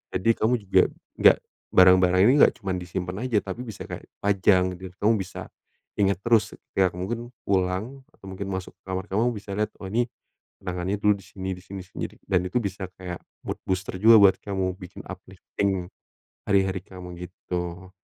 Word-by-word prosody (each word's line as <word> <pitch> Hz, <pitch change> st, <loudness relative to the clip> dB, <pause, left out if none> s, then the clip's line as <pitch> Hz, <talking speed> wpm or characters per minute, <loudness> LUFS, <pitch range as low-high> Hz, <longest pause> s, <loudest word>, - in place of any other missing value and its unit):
Jadi 95 Hz, +5 st, +1 dB
kamu 110 Hz, +3 st, +2 dB
juga 100 Hz, -1 st, +4 dB, 0.4 s
gak -, -, +7 dB, 0.3 s
barang-barang 90 Hz, 0 st, +6 dB
ini 125 Hz, -, +6 dB
enggak -, -, +5 dB
cuma 95 Hz, -4 st, -2 dB
disimpen 90 Hz, 0 st, -4 dB
aja, 120 Hz, -5 st, +2 dB
tapi 100 Hz, +5 st, -5 dB
bisa 110 Hz, -5 st, -7 dB
kayak -, -, -6 dB, 0.2 s
pajang 95 Hz, -2 st, +3 dB
gitu 95 Hz, 0 st, -9 dB
ya, -, -, -26 dB
kamu 110 Hz, +3 st, +5 dB
bisa, 95 Hz, -, -6 dB, 0.5 s
inget 100 Hz, -2 st, +3 dB
terus, 115 Hz, -2 st, +3 dB, 0.3 s
ya 95 Hz, -1 st, +5 dB
mungkin 115 Hz, +7 st, -4 dB, 0.2 s
pulang 95 Hz, +8 st, 0 dB
atau -, -, -18 dB
mungkin 95 Hz, +1 st, -5 dB
masuk 95 Hz, -1 st, -4 dB
ke -, -, -67 dB
kamar 95 Hz, 0 st, -3 dB
kamu 115 Hz, +5 st, +2 dB
bisa 100 Hz, -1 st, -8 dB
lihat, 105 Hz, 0 st, 0 dB
oh 95 Hz, -, -5 dB
nih 120 Hz, +4 st, +1 dB, 0.5 s
kenangannya 90 Hz, +2 st, -2 dB
dulu 105 Hz, -1 st, +5 dB
di 100 Hz, -, -15 dB
sini 95 Hz, -1 st, -6 dB
di -, -, -12 dB
sini 95 Hz, -1 st, -7 dB
sendiri, 95 Hz, -, -6 dB
dan 90 Hz, -1 st, +2 dB
itu 90 Hz, -, -1 dB
bisa 95 Hz, -2 st, -4 dB
kayak 90 Hz, -3 st, -6 dB, 0.3 s
mood -, -, -3 dB
booster 95 Hz, 0 st, -2 dB
juga 115 Hz, +2 st, +8 dB
buat 100 Hz, -1 st, +7 dB
kamu, 95 Hz, -2 st, -2 dB
bikin 90 Hz, -1 st, -10 dB
uplifting 95 Hz, 0 st, -3 dB, 0.6 s
hari-hari 95 Hz, -1 st, +2 dB
kamu 90 Hz, -2 st, -10 dB
gitu. 90 Hz, 0 st, -5 dB
95 Hz, 180 wpm, -25 LUFS, 90-100 Hz, 0.6 s, juga